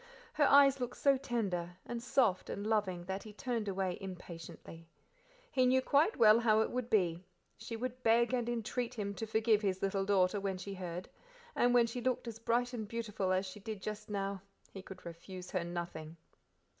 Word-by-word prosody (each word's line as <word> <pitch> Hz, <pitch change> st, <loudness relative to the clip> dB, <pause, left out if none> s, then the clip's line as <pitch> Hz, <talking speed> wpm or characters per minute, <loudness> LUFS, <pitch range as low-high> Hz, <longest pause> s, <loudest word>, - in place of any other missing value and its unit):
Her 295 Hz, -, +3 dB
eyes 275 Hz, -1 st, +6 dB
looked 245 Hz, -1 st, -4 dB
so 275 Hz, -1 st, +4 dB
tender; 195 Hz, -9 st, -2 dB
and 240 Hz, -1 st, -4 dB
soft, 230 Hz, -6 st, +2 dB
and 200 Hz, -, -4 dB
loving 200 Hz, -5 st, 0 dB
that 190 Hz, +2 st, -3 dB
he 215 Hz, -, -11 dB
turned 230 Hz, -1 st, -3 dB
away 190 Hz, -2 st, -1 dB
impatiently; 170 Hz, -3 st, -9 dB, 0.6 s
he 255 Hz, -1 st, +3 dB
knew 260 Hz, +1 st, +5 dB
quite 290 Hz, +10 st, +3 dB
well 220 Hz, -1 st, +7 dB
how 220 Hz, -2 st, +4 dB
it -, -, 0 dB
would 250 Hz, -1 st, -3 dB
be; 180 Hz, -6 st, +2 dB, 0.3 s
she 225 Hz, +1 st, -7 dB
would 255 Hz, +2 st, -4 dB
beg 235 Hz, +1 st, +3 dB
and 240 Hz, -2 st, 0 dB
entreat 240 Hz, +1 st, -2 dB
him 200 Hz, -3 st, -3 dB
to 225 Hz, +2 st, -5 dB
forgive 220 Hz, 0 st, +3 dB
his 190 Hz, -2 st, -1 dB
little 195 Hz, 0 st, +1 dB
daughter 195 Hz, 0 st, +3 dB
when 195 Hz, -1 st, -2 dB
she 195 Hz, +2 st, -6 dB
heard, 180 Hz, -1 st, -5 dB, 0.5 s
and 245 Hz, 0 st, +3 dB
when 240 Hz, -1 st, +6 dB
she 235 Hz, +2 st, -4 dB
looked 250 Hz, 0 st, -1 dB
as 225 Hz, -1 st, -6 dB
bright 240 Hz, +2 st, 0 dB
and 220 Hz, -3 st, -4 dB
beautiful 215 Hz, -4 st, -2 dB
as 185 Hz, +1 st, +1 dB
she 190 Hz, +2 st, -8 dB
did 215 Hz, 0 st, -6 dB
just 210 Hz, +2 st, -6 dB
now 195 Hz, -1 st, -2 dB, 0.3 s
he 195 Hz, -, -8 dB
could 190 Hz, -1 st, -12 dB
refuse 180 Hz, +2 st, -9 dB
her 185 Hz, -3 st, 0 dB
nothing. 170 Hz, -2 st, -6 dB
210 Hz, 195 wpm, -34 LUFS, 185-240 Hz, 0.6 s, well